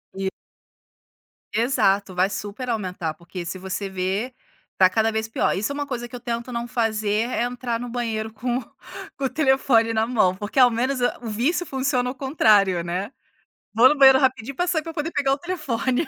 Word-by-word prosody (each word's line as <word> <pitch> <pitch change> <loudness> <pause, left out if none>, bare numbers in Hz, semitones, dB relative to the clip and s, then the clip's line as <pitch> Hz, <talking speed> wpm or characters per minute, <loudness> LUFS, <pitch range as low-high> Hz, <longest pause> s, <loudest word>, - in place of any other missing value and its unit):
E 190 0 -1 1.3
Exato, 200 -5 +1
vai 185 +2 +2
super 205 +6 -5
aumentar, 185 -7 -3
porque 175 +2 -8
se 185 +2 -5
você 190 +2 -4
ver, 190 +6 -2 0.4
tá 185 -1 +5
cada 220 +4 +1
vez 220 0 -2
pior. 225 - 0
Isso 205 +7 -2
é - - -4
uma 290 0 -2
coisa 245 -3 -5
que 250 - -9
eu - - -6
tento 235 0 -4
não 235 0 -3
fazer, 220 -1 0
é 240 - -1
entrar 245 -1 -3
no 245 - -5
banheiro 220 -2 -3
com 245 +3 -2 0.6
com 275 - -3
o - - +1
telefone 265 -5 +2
na 220 0 +1
mão, 215 -7 +2
porque 205 +6 -3
ao 250 -1 +7
menos, 255 +4 -1
hã, 245 - +1
o 240 - -7
vício 255 +12 0
funciona 265 -4 -1
ao 255 - -6
contrário, 210 - +3
né. 180 +6 -3 0.6
Vou 235 +3 +8
no 300 - +2
banheiro 270 -2 +8
rapidinho 260 -1 0
pra 355 - 0
sair 350 -3 0
pra 330 - -7
poder 320 +1 -3
pegar 275 -3 +1
o - - -1
telefone. 285 -4 -2
235 Hz, 200 wpm, -23 LUFS, 205-265 Hz, 1.3 s, Vou